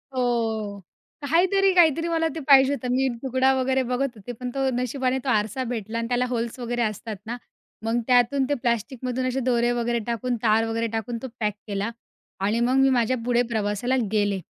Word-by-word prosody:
हो 225 -5 -1 0.4
काहीतरी, 370 +7 +3
काहीतरी 330 -2 +4
मला 325 -1 +1
ते - - -3
पाहिजे 275 -1 +7
होतं. 255 -2 -4
मी 265 +1 +2 0.2
तुकडा 265 0 +2
वगैरे 260 0 +1
बघत 255 0 -1
होते, 215 +3 -8
पण 250 +2 -6
तो 270 +1 0
नशिबाने 255 +1 -1
तो 270 - -2
आरसा 220 +2 0
भेटला 230 -2 -4
आणि 230 - -2
त्याला 245 +1 +1
होल्स 235 0 -3
वगैरे 240 0 -2
असतात 215 0 -3
ना, 240 +2 -4 0.5
मग 230 +2 +1
त्यातून 250 +2 +3
ते - - +2
प्लॅस्टिकमधून 250 +2 -1
असे 255 +1 -1
दोरे 240 -1 +2
वगैरे 240 0 0
टाकून, 240 +1 -1
तार 225 0 +3
वगैरे 230 0 -1
टाकून 230 +2 -3
तो 265 - -5
पॅक 210 -2 0
केला 200 +1 -2 0.6
आणि 215 +3 +1
मग 245 +2 +2
मी 270 0 +5
माझ्या 250 0 +2
पुढे 245 -1 +3
प्रवासाला 215 +4 0 0.2
गेले. 205 -2 +1
245 Hz, 185 wpm, -24 LUFS, 225-265 Hz, 0.6 s, पाहिजे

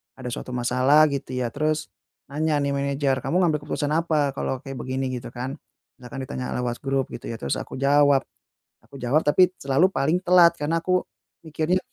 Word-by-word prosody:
ada 125 -2 -6
suatu 125 - -6
masalah 130 +5 +4
gitu 135 -2 -4
ya 120 -2 -1
terus 155 +1 -1 0.4
nanya 155 +1 0
nih 140 0 0
manager, 140 -1 0
"Kamu 180 - +1
ngambil 155 -3 +2
keputusan 145 0 -2
apa 155 -4 +1
kalau 130 -1 -2
kayak 135 -1 -7
begini?" 130 +1 -2
Gitu 125 - -5
kan. 130 +3 -5 0.4
Misalkan 130 +2 -7
ditanya 130 -2 -5
lewat 120 -1 -2
grup 135 -1 0
gitu - - -8
ya. - - -4
Terus 70 - -2
aku - - -8
jawab 140 -1 +4 0.6
aku - - -17
jawab 135 +6 +1
tapi 180 +5 +4
selalu 140 +7 +3
paling 160 +6 +1
telat 175 -2 +6
karena 165 +3 0
aku 185 +1 +1 0.4
mikirnya, 160 +4 0
140 Hz, 180 wpm, -24 LUFS, 130-155 Hz, 0.6 s, telat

